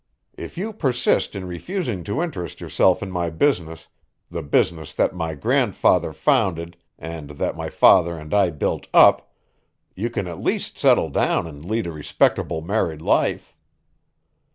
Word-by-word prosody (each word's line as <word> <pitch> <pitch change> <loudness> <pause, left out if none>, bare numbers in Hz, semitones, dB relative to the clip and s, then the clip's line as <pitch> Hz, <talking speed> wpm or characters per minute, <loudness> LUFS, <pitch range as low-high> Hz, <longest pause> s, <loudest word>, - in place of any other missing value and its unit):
If - - -9
you 215 +5 -3
persist 130 - 0
in 95 -2 -5
refusing 110 - -4
to 130 +11 -1
interest 90 - -6
yourself 95 +1 +2
in 95 - -6
my 85 -2 -1
business, 80 - -1 0.4
the 85 -1 -4
business 80 +1 0
that - - +1
my 80 -1 -4
grandfather 70 - +2
founded 85 -2 0 0.2
and 80 -3 -8
that - - -2
my - - -5
father 85 -2 +4
and 75 0 -8
I 100 -3 +4
built 75 -4 -3
up, - - +6 0.6
you 110 +6 -2
can 105 -5 -3
at 85 -2 -7
least - - -2
settle - - +4
down - - +1
and 75 -2 -10
lead 110 +6 -2
a 85 - -4
respectable 75 +1 0
married 85 -5 -1
life. - - 0
85 Hz, 155 wpm, -22 LUFS, 80-105 Hz, 0.6 s, up